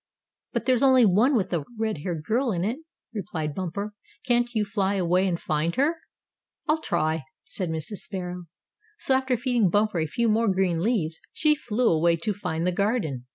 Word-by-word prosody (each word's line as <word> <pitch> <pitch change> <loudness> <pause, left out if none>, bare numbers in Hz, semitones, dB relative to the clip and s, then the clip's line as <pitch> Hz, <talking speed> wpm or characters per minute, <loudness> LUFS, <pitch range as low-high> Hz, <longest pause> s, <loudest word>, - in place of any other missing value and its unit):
"But - - -1
there's 255 -2 +3
only 260 -3 +6
one 220 +8 +4
with 195 -5 0
a 165 -4 0
red 220 -6 -1
haired 165 -1 -4
girl 235 - +1
in 175 -3 -1
it," 230 +8 -1 0.3
replied 160 -7 -3
Bumper. 190 +5 -4 0.3
"Can't 240 -1 +2
you 215 -1 +2
fly 200 -1 0
away, 180 0 +2
and 170 -2 -1
find 155 +2 -1
her?" 305 +5 +2 0.7
"I'll 315 +1 +2
try," 155 - 0 0.2
said 185 -3 -3
Mrs. 160 +5 -4
Sparrow. 180 -3 -5 0.5
So 265 - +1
after 260 -1 +2
feeding 240 -4 +2
Bumper 205 -1 +2
a 160 - 0
few 235 +8 0
more 220 -1 +3
green 185 -3 +1
leaves, 170 -7 0
she 305 -1 +3
flew 245 -4 0
away 165 +1 +3
to 165 +6 -2
find 175 -4 -3
the 180 - +2
garden. 180 - -1
200 Hz, 185 wpm, -26 LUFS, 170-235 Hz, 0.7 s, only